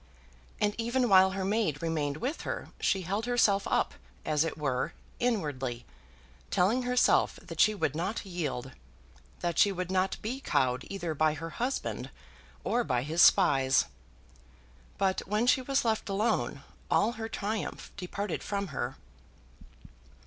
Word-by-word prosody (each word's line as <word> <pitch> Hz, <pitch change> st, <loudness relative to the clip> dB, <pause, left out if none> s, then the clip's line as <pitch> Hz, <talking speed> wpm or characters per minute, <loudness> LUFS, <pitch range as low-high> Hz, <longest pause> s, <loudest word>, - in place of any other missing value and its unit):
And 210 Hz, 0 st, +2 dB
even 240 Hz, +2 st, +1 dB
while 190 Hz, -1 st, +6 dB
her 190 Hz, -, -1 dB
maid 195 Hz, -8 st, 0 dB
remained 150 Hz, -3 st, -1 dB
with 260 Hz, -, -3 dB
her -, -, -4 dB
she 195 Hz, -2 st, +1 dB
held 200 Hz, +7 st, -2 dB
herself 210 Hz, -5 st, +3 dB
up, -, -, +1 dB, 0.3 s
as 150 Hz, 0 st, +2 dB
it 165 Hz, -, -3 dB
were, 135 Hz, -4 st, -1 dB, 0.3 s
inwardly, 145 Hz, -, -1 dB, 0.6 s
telling 200 Hz, +7 st, +2 dB
herself 250 Hz, 0 st, +3 dB
that -, -, -10 dB
she 215 Hz, -, +5 dB
would 150 Hz, -7 st, -1 dB
not 190 Hz, +7 st, -2 dB
yield, 150 Hz, -8 st, -3 dB, 0.7 s
that 170 Hz, -1 st, -1 dB
she 205 Hz, -, +6 dB
would 185 Hz, -1 st, -4 dB
not 190 Hz, 0 st, +1 dB
be 245 Hz, +5 st, -3 dB
cowed 130 Hz, -, +1 dB
either 175 Hz, -5 st, -3 dB
by 155 Hz, +1 st, +2 dB
her 165 Hz, +2 st, -6 dB
husband 250 Hz, -, -3 dB, 0.5 s
or 245 Hz, +1 st, +1 dB
by 125 Hz, -, 0 dB
his 160 Hz, +5 st, +1 dB
spies. 135 Hz, -8 st, +5 dB, 1.1 s
But 190 Hz, -1 st, +1 dB
when 210 Hz, +4 st, +1 dB
she 255 Hz, +1 st, +4 dB
was 270 Hz, 0 st, 0 dB
left 220 Hz, -2 st, 0 dB
alone 215 Hz, +3 st, 0 dB, 0.3 s
all 215 Hz, +3 st, +3 dB
her 225 Hz, -1 st, -6 dB
triumph 215 Hz, 0 st, -4 dB
departed 200 Hz, 0 st, -4 dB
from 200 Hz, -2 st, -3 dB
her. 130 Hz, -2 st, -3 dB
190 Hz, 145 wpm, -30 LUFS, 155-220 Hz, 1.1 s, while